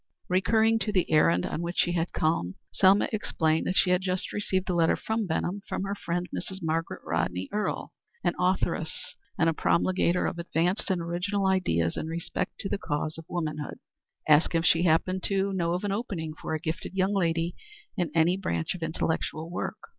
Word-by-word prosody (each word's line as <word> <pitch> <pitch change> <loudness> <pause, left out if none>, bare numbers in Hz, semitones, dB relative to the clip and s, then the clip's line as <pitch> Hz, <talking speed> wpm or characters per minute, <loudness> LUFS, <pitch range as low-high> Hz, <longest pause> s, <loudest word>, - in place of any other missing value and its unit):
Recurring 220 +4 +3
to 215 - -1
the 185 -5 +1
errand 90 - +4
on 160 - -3
which 170 +1 -4
she 175 - +3
had 170 0 -1
come, 155 - 0 0.2
Selma 195 +1 +5
explained 160 -6 0
that 185 - 0
she 180 - +4
had 180 +1 +3
just 185 -1 -2
received 190 -2 -1
a 185 - 0
letter 165 -2 +3
from 220 -2 -2
Benham 180 +4 -1
from - - -2
her 195 0 -2
friend, 175 -2 -2
Mrs. 190 - -4
Margaret 165 +1 -2
Rodney 90 +2 -1
Earle, 210 0 -2 0.3
an - - +2
authoress 180 -3 -1 0.2
and 165 - +3
a 165 - +3
promulgator 180 +2 +2
of 175 - -2
advanced 175 +4 0
and 185 -3 +1
original 180 +4 -1
ideas 85 - +1
in - - -3
respect 165 +1 -3
to - - -3
the 200 - -2
cause 155 0 -2
of 165 - -10
womanhood, 155 -4 -3 0.5
asking 160 +2 +5
if - - -3
she 165 +2 +4
happened 185 +3 +2
to 195 0 +1
know 170 -2 0
of 180 - -3
an 205 - -1
opening 190 -7 -3
for 160 - -4
a - - -2
gifted 160 +3 -4
young 190 +1 +2
lady 170 -2 +1 0.4
in 175 -6 0
any 165 +2 +4
branch 85 - -1
of 180 - -8
intellectual 160 0 -2
work. 175 - -3
175 Hz, 190 wpm, -28 LUFS, 160-190 Hz, 0.5 s, Selma